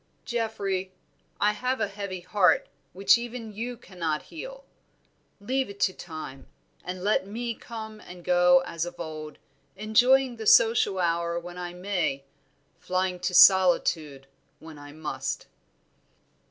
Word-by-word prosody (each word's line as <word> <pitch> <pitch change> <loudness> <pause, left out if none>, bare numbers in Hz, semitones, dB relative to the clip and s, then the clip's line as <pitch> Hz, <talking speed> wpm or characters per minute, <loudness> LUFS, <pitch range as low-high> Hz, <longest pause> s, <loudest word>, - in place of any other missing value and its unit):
"Geoffrey, 200 -5 -2 0.5
I 210 - +3
have 250 +5 -2
a - - +1
heavy 200 -2 -6
heart 180 +1 +3 0.2
which 195 +5 +4
even 235 -2 -7
you 235 +4 -5
cannot 165 -8 -4
heal. - - -9 0.7
Leave 260 +5 -1
it 200 0 -10
to 185 - +3
time, 155 -7 -9 0.4
and 180 0 -6
let 205 -1 +1
me 235 +3 -3
come 220 -2 -9
and 180 0 -12
go 180 0 +5
as 165 -2 -3
of 175 0 -7
old, 155 -2 -7 0.4
enjoying 245 +5 +3
the 220 -1 -5
social 225 -4 +5
hour 170 -1 0
when 175 +1 -9
I 175 0 -6
may, 180 -7 -2 0.6
flying 185 0 -1
to 180 0 -2
solitude 175 -6 +5 0.3
when 160 -2 -12
I 145 0 -11
must." 145 -3 -4
185 Hz, 135 wpm, -27 LUFS, 175-220 Hz, 0.7 s, go